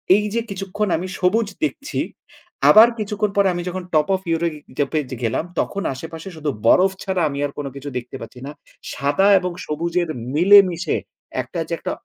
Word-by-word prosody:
এই 210 - +2
যে 235 - +1
কিছুক্ষণ 195 +2 -3
আমি 180 +3 -4
সবুজ 210 +5 +2 0.2
দেখছি। 295 -2 -2 0.7
আবার 220 +2 +9
কিছুক্ষণ 210 0 -1
পরে 200 - +5
আমি 175 - -3
যখন 185 0 -5
টপ 155 -1 +3
ওফ 190 - -5
ইউরোপ 165 -2 -1 0.2
জ্যাপে 145 +2 0
যে 130 - -3
গেলাম, 115 +7 0 0.2
তখন 200 0 -2
আশেপাশে 165 +6 -8
শুধু 155 -2 -3 0.2
বরফ 185 +10 +5
ছাড়া 190 -3 -1
আমি 140 0 -5
আর 145 - -4
কোন 145 - -4
কিছু 140 +1 -6
দেখতে 125 +2 -7
পাচ্ছি 115 +2 -10
না। 145 - -6 0.4
সাদা 145 +9 +2
এবং 180 -1 -3
সবুজের 170 +2 -1 0.3
মিলেমিশে 185 0 +5 0.4
একটা 175 - -6
যে 170 - -4
একটা - - -3
175 Hz, 180 wpm, -21 LUFS, 150-195 Hz, 0.7 s, আবার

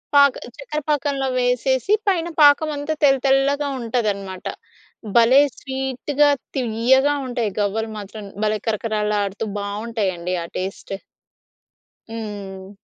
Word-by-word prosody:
పాక 280 -2 +7 0.2
చక్కర 300 +2 -4
పాకంలో 280 -2 0
వేసేసి, 250 - +1
పైన 345 -4 +2
పాకం 290 +1 +6
అంతా 290 +2 -2
తెల్ల 275 -2 +6
తెల్లగా 275 +2 +3
ఉంటదన్నమాట. 205 -6 -2 0.7
భలే 240 +4 +7 0.2
స్వీట్‌గా, 265 +2 0 0.3
తియ్యగా 260 +3 +3
ఉంటాయి 240 -4 -1
గవ్వలు 220 +2 -1
మాత్రం. 205 +1 -8 0.2
భలే 215 0 +1
కరకరలాడుతూ 210 -1 -1
బాగుంటాయి 210 0 -2
అండి. 175 +2 -3
ఆ - - -6
టేస్ట్. 190 +1 -5 1.2
హ్మ్. 200 -4 -7
235 Hz, 110 wpm, -21 LUFS, 210-275 Hz, 1.2 s, పాక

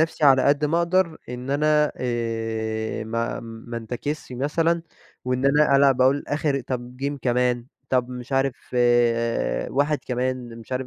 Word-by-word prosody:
نفسي 160 -1 +1
على 135 -2 +6
قد 145 +1 +3
ما 160 +3 +2
أقدر، 170 -1 +1
إن 125 +2 -6
أنا 150 +1 +3
آآ، 115 -2 -2
ما 115 +1 -2
ما 115 +1 -8
انتكسش 125 +6 -5
مثلًا، 165 +6 0 0.4
وإن 125 +1 -1
أنا 145 0 +4
ألعب 135 -2 +4
أقول 135 +2 +3
آخر 145 -2 0
طب 125 0 -5
Game 140 +1 -2
كمان، 125 -1 +1 0.2
طب 125 -1 +1
مش 125 +1 -8
عارف، 135 -1 +2 1.2
واحد 145 +2 +1
كمان، 125 -2 -3
مش 115 +3 -10
عارف 130 0 -2
130 Hz, 150 wpm, -24 LUFS, 120-145 Hz, 1.2 s, على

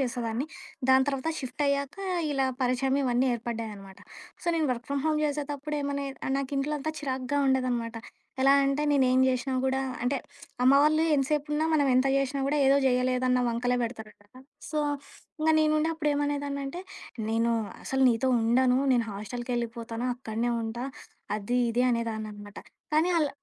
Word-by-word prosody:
చేసేదాన్ని. 245 0 -2 0.4
దాని 265 0 +6
తర్వాత 275 +2 -1
షిఫ్టయ్యాక, 280 +1 -1 0.4
ఇలా 270 -1 +1 0.2
పరిచయం 260 +2 +1
ఇవన్నీ 250 0 +2
ఏర్పడ్డాయనమాట. 220 -4 -6 0.4
సో, - - -12
నేను 315 -2 +1
వర్క్ 240 -1 -7
ఫ్రమ్ 280 -1 -1
హోమ్ 305 -1 +1
జేసేతప్పుడు 295 0 -3
ఏమన్నా 280 -2 -3
నాకు 275 0 -4
ఇంట్లో 280 +2 0
అంతా 310 +3 -3
చిరాగ్గా 265 0 -2
ఉండేదనమాట. 245 -3 0 0.5
ఎలా 270 +1 +6
అంటే 275 +2 +1
నేను 275 -2 +4
ఏం 255 - +4
జేసినా 260 +1 -1
గూడా, 265 0 +1 0.2
అంటే 250 +3 +1 0.5
అమ్మవాళ్లు 295 +4 +5
ఎంతసేపున్నా 295 +2 0
మనం 290 -2 +3
ఎంత 255 +2 +4
జేసినా 275 0 0
గూడా 295 +2 +1
ఏదో 275 +1 +5
జేయలేదన్న 255 0 +2
వంకలే 245 +1 0
పెడతారు 225 -2 -5
కదా! 205 +5 -18 0.3
సో, 305 - -1 0.6
ఇంగ 315 +1 +3
నేనుండి 310 0 +2
అప్పుడు 305 -2 0
ఏమనేదాన్నాంటే, 285 +1 -2 0.5
నేను 230 +1 +1 0.3
అసలు 265 0 0
నీతో 235 +3 +1
ఉండను, 250 +3 +3 0.2
నేను 235 -2 +1
హాస్టలకెళ్ళిపోతాను. 235 +2 -4
అక్కడనే 235 -1 -2
ఉంటా 225 +2 -4 0.5
అది, 215 +4 -1
ఇది 240 +2 +1
అనేదాననమాట. 215 -3 -4 0.4
కానీ 320 +4 +3
అల 305 -3 +2
260 Hz, 145 wpm, -28 LUFS, 235-280 Hz, 0.6 s, దాని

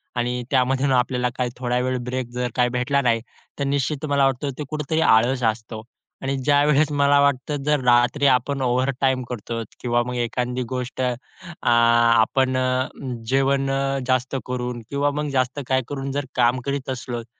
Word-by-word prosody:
आणि 125 0 -1
त्यामधून 135 +1 +2
आपल्याला 125 0 +1
काही 125 -1 0
थोडा 125 -1 -1
वेळ 130 0 -1
ब्रेक 125 -1 -3
जर 125 0 -2
काही 125 -1 +2
भेटला 125 +3 0
नाही. 115 -3 +1 0.4
तर - - 0
निश्चित 140 +2 -1
मला 140 -2 +2
वाटतं 135 +1 0
ते 150 - -3
कुठेतरी 155 +1 -1
आळस 120 +2 +3
असतो 110 0 -2 0.4
आणि 135 +1 -1
ज्यावेळेस 145 +2 +3
मला 140 0 +3
वाटतं, 140 +1 +1
जर 150 -1 +2
रात्री 120 +4 +3
आपण 135 +2 +1
ओव्हरटाईम 130 +1 +1
करतो 115 -1 -4 0.2
किंवा 120 -1 +1
मग 125 - -4
एखादी 125 +1 -2
गोष्ट 125 0 -4
अ, 125 -1 +1 0.6
आपण 120 +2 +4
अ, 130 0 +1 0.4
जेवण 135 0 +2
अ, 135 0 0
जास्त 130 +1 0
करून 125 -1 -3
किंवा 145 +1 0
मग 150 0 -3
जास्त 130 +2 0
काय 130 0 +2
करून 135 -1 -4
जर 140 0 -2
काम 125 +1 +3
करीत 140 -1 -3
असलोत. 120 -2 -4
130 Hz, 165 wpm, -22 LUFS, 125-140 Hz, 0.6 s, आपण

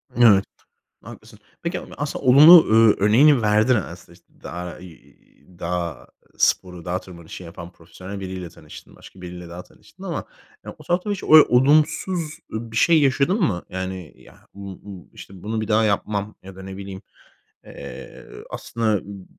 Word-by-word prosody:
Evet, 110 -5 +5 0.6
haklısın. - - -14 0.2
Peki, - - -3
a - - -11
aslında 145 +2 -5
olumlu 155 +6 +9
ö 110 -1 +5
örneğini 130 +5 +5
verdin 110 +4 +3
aslında, 85 -4 -6
işte, 85 0 -26
dağ, 90 0 -7
iii, 85 -4 -18
dağ 85 -4 -4 0.3
sporu, 90 -2 0
dağ 90 +1 -2
tırmanışı 85 -1 -11
yapan 85 0 -10
profesyonel 90 +4 -11
biriyle 95 -2 -7
tanıştın. 75 -1 -15
Başka 95 - -16
biriyle 90 -1 -9
daha 90 +1 -9
tanıştın - - -19
ama, - - -4 0.4
ya, - - -9
o - - -15
taraftan 180 +4 -1
hiç 200 - -4
oy 155 -1 +7
olumsuz, 150 +8 +2 0.3
eee, 110 - -3
bir - - -9
şey 165 +2 +4
yaşadın 140 - +1
mı? 95 - 0
Yani 95 -3 -6
ya - - -18 0.2
m 100 - -15 0.2
bu, 95 -4 -12
işte, 95 -2 -13
"Bunu 110 +1 -3
bir 110 - -4
daha 110 +1 +2
yapmam." 105 0 -2
ya 95 0 -12
da 95 - -11
ne 95 0 -9
bileyim. 95 -1 -8 0.6
Eee, - - -11 0.2
aslında 110 -4 -2
m 100 -2 -11
100 Hz, 165 wpm, -22 LUFS, 90-120 Hz, 0.6 s, olumlu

